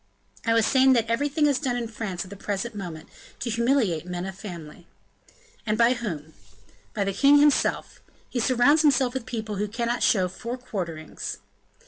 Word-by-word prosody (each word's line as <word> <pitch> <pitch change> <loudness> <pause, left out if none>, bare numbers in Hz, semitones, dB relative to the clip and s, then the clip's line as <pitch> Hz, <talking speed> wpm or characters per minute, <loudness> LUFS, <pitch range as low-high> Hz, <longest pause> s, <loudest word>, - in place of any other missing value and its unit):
"I 230 - +4
was 225 -2 +4
saying 265 +1 +5
that 230 -3 +2
everything 285 +6 +1
is 285 -3 +2
done 260 -5 -1
in 240 -1 -2
France 210 -5 -4
at 185 - -13
the - - -7
present 205 +4 -3
moment, 175 -6 -7 0.3
to 235 - -3
humiliate 235 - +1
men 180 0 -4
of 190 - -5
family." 175 -4 -9 0.8
"And 215 -1 -1
by 235 +2 +5
whom?" 165 - -5 0.6
"By 205 - +1
the 195 0 -2
king 280 +7 +5
himself. 295 0 +2 0.3
He 250 - -3
surrounds 255 +6 +4
himself 265 -5 +3
with 260 -2 -5
people 220 -4 -4
who 210 +2 -1
cannot 235 +3 -2
show 185 -4 +3
four 235 +7 -6
quarterings." 175 -10 -5
230 Hz, 175 wpm, -25 LUFS, 190-255 Hz, 0.8 s, saying